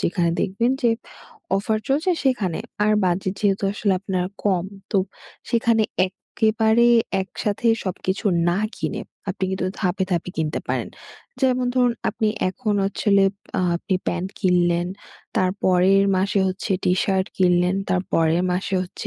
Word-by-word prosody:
যেখানে 170 -1 +1
দেখবেন 230 +6 +1
যে, 240 - +4 0.7
অফার 215 +2 0
চলছে 305 +7 +1
সেখানে। 210 -11 +1 0.3
আর 215 - +3
বাজেট 185 +1 0
যেহেতু 200 -1 +1
আসলে 205 -1 0
আপনার 185 -2 -1 0.2
কম, 185 -4 +2 0.3
তো 195 - +3 0.5
সেইখানে 230 -1 +2 0.2
এক্কেবারে 220 +4 +2 0.3
একসাথে 205 +3 -3 0.2
সবকিছু 190 +3 -2 0.2
না 175 - +1 0.2
কিনে, 215 - -3 0.3
আপনি 190 - -3
কিন্তু 190 -1 -1
ধাপে, 190 0 0
ধাপে 175 0 -1
কিনতে 155 -1 -1
পারেন। - - -1 0.5
যেমন 255 -1 +2
ধরুন 245 -2 +3 0.2
আপনি 220 - 0 0.2
এখন 210 +2 -2
হচ্ছে 195 - -3
হলে 200 -1 +5 0.3
আ - - +2 0.2
আপনি 190 +3 -2
প্যান্ট 175 +2 -1
কিনলেন, 175 -2 +2 0.5
তার 185 -1 +3
পরের 190 +2 +4
মাসে 195 +1 +1
হচ্ছে 185 +1 -3
টি-শার্ট 190 +1 +1
কিনলেন, 180 0 +3
তার 180 -1 +1
পরের 165 +2 +3
মাসে 190 +2 -2
হচ্ছে 185 - -7
190 Hz, 140 wpm, -22 LUFS, 180-215 Hz, 0.7 s, হলে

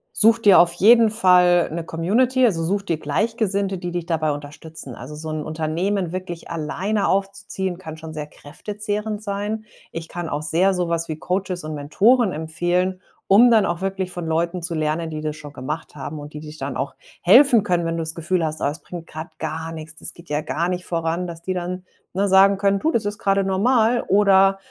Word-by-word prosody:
such 225 +1 +5
dir 205 -5 +7
auf 170 0 +5
jeden 225 +5 +6
Fall 180 -4 +4
'ne 165 +1 -3
Community. 235 +12 +1
Also, 170 -8 +1
such 195 +5 0
dir 170 -5 -1
Gleichgesinnte, 200 +4 -1
die 175 0 -5
dich 175 -1 -3
dabei 160 -3 0
unterstützen. 145 -2 -8
Also, 130 +6 -9
so 155 +1 -7
'n 155 -1 -3
Unternehmen 165 +4 -2
wirklich 180 -2 -6
alleine 180 +6 -1
aufzuziehen, 195 -1 -2
kann 160 -4 -8
schon 160 0 -9
sehr 150 -1 -5
kräftezehrend 210 +7 -5
sein. 210 +2 -3 0.3
Ich 165 0 -6
kann 175 -1 -5
auch 145 -1 -3
sehr 170 +6 +2
so 180 -2 -1
was 170 0 -1
wie 155 - -3
Coaches 185 +1 -3
und 155 0 -5
Mentoren 200 - +3
empfehlen, 175 +4 -1 0.3
um 235 +5 +7
dann 215 -4 +4
auch 175 +1 -3
wirklich 190 -1 -2
von 175 -2 -5
Leuten 170 +2 -1
zu 170 0 -3
lernen, 155 +1 -1
die 155 0 -5
das 155 -1 -3
schon 150 -2 -11
gemacht 150 +5 -6
haben 145 +2 -6
und 145 +1 -10
die 150 - -6
dich 155 0 -10
dann 135 -2 -4
auch 140 - -3 0.3
helfen 245 +5 +6
können, 175 -3 0
wenn 165 0 -1
du 165 - -2
das 160 0 -4
Gefühl 170 +1 -1
hast: 155 0 -3
„Oh, - - +1
es 145 +2 -2
bringt 175 -2 -9
grad 160 +1 -9
gar 160 +1 -4
nix, 160 0 -8
das - - -4
geht 170 -2 -16
ja 150 0 0
gar 165 +3 -2
nicht 180 0 -3
voran.“ 165 +1 -2
Dass 170 -1 -9
die 185 - -2
dann, 180 0 -4 0.3
ne, 195 +2 +1
sagen 195 +1 +5
können: 200 0 +2
„Du, 315 - +1
das 230 -8 0
ist 205 +1 -3
gerade 195 -2 +2
normal 225 +5 +2
oder 195 -1 +5
175 Hz, 210 wpm, -22 LUFS, 160-195 Hz, 0.3 s, dir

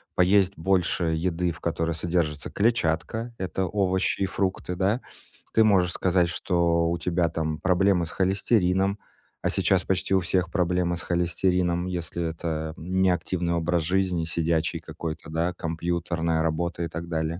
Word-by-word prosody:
поесть 95 +1 +4
больше 90 0 +1
еды, 85 +2 0
в 80 - -10
которой 85 0 -1
содержится 80 -3 -1
клетчатка. 110 +1 0
Это 95 0 -2
овощи 95 -1 0
и - - +3
фрукты, 95 -2 -2
да? 100 +7 +1 0.5
Ты 110 - +5
можешь 95 -5 +4
сказать, 90 -2 +2
что 85 -2 +1
у 85 - 0
тебя 85 0 +1
там 80 -1 -2
проблемы 95 -1 +2
с 80 - -6
холестерином, 95 0 +1 0.4
а - - 0
сейчас 95 -2 +2
почти 95 0 0
у 95 - +5
всех 90 -1 0
проблемы 90 -2 +1
с - - -7
холестерином, 90 0 0
если 85 -1 -3
это 80 -1 -4
не 95 +3 +1
активный 90 0 -1
образ 85 0 +1
жизни, 90 -1 0
сидячий 85 0 0
какой-то, 80 -1 -6
да, 85 +3 -1
компьютерная 85 -1 -1
работа 85 +1 -1
и 85 - -1
так 85 +2 -6
далее. 80 0 -2
85 Hz, 150 wpm, -26 LUFS, 85-95 Hz, 0.5 s, Ты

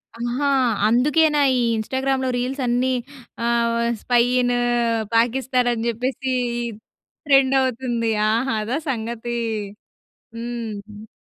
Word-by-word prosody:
ఆహా! 240 +4 -2 0.4
అందుకేనా 295 +6 +3 0.2
ఈ - - +1 0.2
ఇన్‌స్టా‌గ్రామ్‌లో 265 +3 -1
రీల్స్ 260 +3 -2
అన్నీ 245 +2 +1 0.5
ఆహ్, 235 0 +2
వ - - -1 0.3
స్పై 245 -1 +3 0.2
ఇన్ 245 0 +1 0.6
పాకిస్తాన్ 250 +2 +2
అని 230 -1 -2
జెప్పేసి 255 +3 -2 0.9
ట్రెండవుతుంది. 260 -4 +2 0.2
ఆహా! 235 +3 0
అదా 240 +6 -2
సంగతి! 235 -1 -3 1.0
హ్మ్. 220 -3 -6
245 Hz, 95 wpm, -22 LUFS, 230-265 Hz, 1.0 s, అందుకేనా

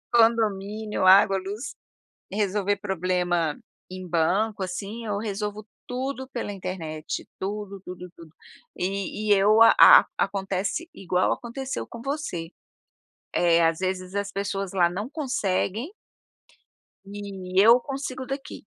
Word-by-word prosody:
Condomínio, 215 -3 +2
água, 195 +1 +7
luz, 205 +7 -6 0.6
resolver 205 0 0
problema 180 -5 -1 0.3
em 185 0 -7
banco, 185 +6 +1
assim, 205 +5 -5
eu 205 -2 -2
resolvo 210 0 -4 0.2
tudo 260 +1 -4
pela 240 -5 -4
internet 175 -5 -5
tudo, 200 0 -5
tudo, 180 0 -8
tudo, 165 -3 -15 0.4
e 200 +3 -3
e - - +7
eu 205 +3 +4
a 230 - +9
acontece 195 - -2
igual 180 -1 0
aconteceu 260 +3 -4
com 235 - -10
você, 270 - -4 0.9
eh, 170 -1 +4
às 165 0 -1
vezes 185 0 -3
as 200 0 -2
pessoas 195 -1 -3
lá 175 -3 +3
não 205 +7 -5
conseguem 250 - -1 1.1
e 195 -2 -2
eu 230 +4 +7
consigo 265 -1 -5
daqui, 270 +1 -7
200 Hz, 120 wpm, -25 LUFS, 185-225 Hz, 1.1 s, a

